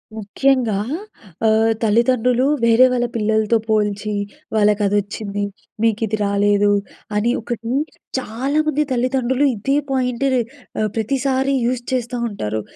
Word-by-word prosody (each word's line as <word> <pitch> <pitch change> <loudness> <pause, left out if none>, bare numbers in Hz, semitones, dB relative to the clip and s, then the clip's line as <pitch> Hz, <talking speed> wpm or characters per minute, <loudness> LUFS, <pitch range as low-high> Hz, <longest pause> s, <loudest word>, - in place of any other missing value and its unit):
ముఖ్యంగా 225 +1 +1 0.7
ఆహ్, 220 +1 +4
తల్లిదండ్రులు 240 +3 +3 0.2
వేరే 230 +2 +6
వాళ్ళ 245 -1 +1
పిల్లలతో 220 0 +2
పోల్చి, 210 -1 0 0.4
వాళ్ళకదొచ్చింది. 205 0 +1 0.4
మీకు 225 -1 +2
ఇది 215 +1 -1
రాలేదు. 205 0 +3 0.4
అని 225 +3 +2
ఒకటి 230 0 -4 0.5
చాలా 260 +5 -2
మంది 300 0 +2
తల్లిదండ్రులు 255 +2 +1
ఇదే 270 +7 0 0.2
పాయింట్‌ 255 -1 0
రె 250 - +3 0.4
ఆహ్, 215 0 +1
ప్రతిసారి 265 +4 0
యూజ్ 245 0 -1
చేస్తా 245 0 -2
ఉంటారు. 110 - -3
225 Hz, 115 wpm, -20 LUFS, 210-255 Hz, 0.7 s, వేరే